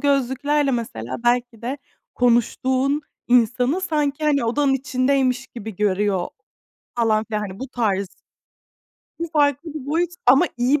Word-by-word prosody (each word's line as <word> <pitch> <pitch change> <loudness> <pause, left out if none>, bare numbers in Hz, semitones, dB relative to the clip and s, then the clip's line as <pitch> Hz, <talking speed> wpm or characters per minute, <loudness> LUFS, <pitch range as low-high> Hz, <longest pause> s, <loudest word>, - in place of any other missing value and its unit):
gözlüklerle 280 +1 +1
mesela 130 - -3
belki 240 -1 +1
de 265 +4 -3 0.4
konuştuğun 255 +4 +2 0.3
insanı 250 - +3
sanki, 300 -4 -1
hani, 285 -4 +2
odanın 270 +4 +2
içindeymiş 260 0 0
gibi 220 -5 -8
görüyor 200 -2 +1 0.7
falan 220 -2 +2
filan. 215 -2 -3
Hani 195 -2 -6
bu 265 - -5
tarz 200 -6 -1 1.1
Bu 335 - -2
farklı 290 +1 +1
bir 290 -4 -6
boyut 330 +4 0 0.2
ama 270 +8 +6
iyi 255 +4 +2
255 Hz, 130 wpm, -22 LUFS, 230-285 Hz, 1.1 s, ama